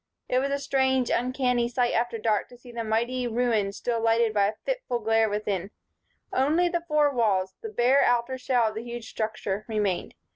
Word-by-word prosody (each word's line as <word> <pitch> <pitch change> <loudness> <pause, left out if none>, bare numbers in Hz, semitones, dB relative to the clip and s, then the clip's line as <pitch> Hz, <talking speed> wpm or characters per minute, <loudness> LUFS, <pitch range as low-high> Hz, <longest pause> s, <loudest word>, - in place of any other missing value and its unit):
It 250 - +2
was 275 +1 -1
a 280 - 0
strange, 265 -2 +1
uncanny 250 -1 +1
sight 245 0 0
after 235 0 0
dark 215 -1 0
to 245 - -14
see 245 0 -13
the 235 -1 -4
mighty 235 +3 0
ruin 230 -4 +1
still 230 +3 -2
lighted 225 0 +2
by 200 -1 +3
a 210 - -3
fitful - - -2
glare 225 0 +2
from 205 - -4
within. 200 -3 -2 0.6
Only 310 +7 +3
the 345 -1 -2
four 300 -2 +3
walls, 195 -6 +1
the 445 - -5
bare 265 - +3
outer 245 +2 +1
shell 245 -3 +2
of - - -9
the 220 +1 -5
huge 235 -1 -7
structure, 215 -2 -3
remained. 210 -5 -1
240 Hz, 195 wpm, -26 LUFS, 220-255 Hz, 0.6 s, by